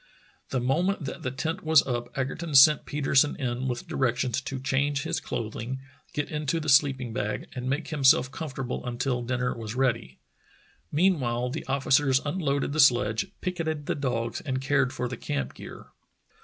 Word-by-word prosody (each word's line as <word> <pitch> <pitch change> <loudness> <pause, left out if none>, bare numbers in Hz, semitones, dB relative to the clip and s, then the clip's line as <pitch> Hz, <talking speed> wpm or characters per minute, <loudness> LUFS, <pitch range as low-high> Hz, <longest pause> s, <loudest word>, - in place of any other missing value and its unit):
The 130 - 0
moment 165 - 0
that - - -6
the 130 - -2
tent 160 +8 -3
was 160 -2 +5
up 120 -2 -3
Egerton 145 +4 -3
sent 145 +3 +7
Peter 145 -1 -2
sen 140 +2 +5
in 125 -1 -2
with 125 -1 -4
directions 125 0 0
to 135 0 -5
change 140 +2 0
his - - -1
clothing, 115 +3 -4 0.3
get 145 - -3
into 150 +1 -1
the 155 -1 -3
sleeping 135 -4 +3
bag, 105 -3 -3
and 125 0 -4
make 145 +4 -2
himself 135 -4 +4
comfortable 135 -5 -5
until 125 +1 -2
dinner 125 +1 -1
was 115 -1 -6
ready. 120 - 0 0.7
Meanwhile 130 -8 +1
the 155 - -5
officers 135 0 +3
unloaded 145 -3 -1
the 155 - -2
sledge, 120 -5 +4
picketed 160 -5 -3
the - - 0
dogs, 120 -5 -2
and 130 -3 -2
cared 135 -1 +1
for 125 - -3
the 125 0 -6
camp 70 - -3
gear. - - -11
135 Hz, 170 wpm, -27 LUFS, 125-145 Hz, 0.7 s, sent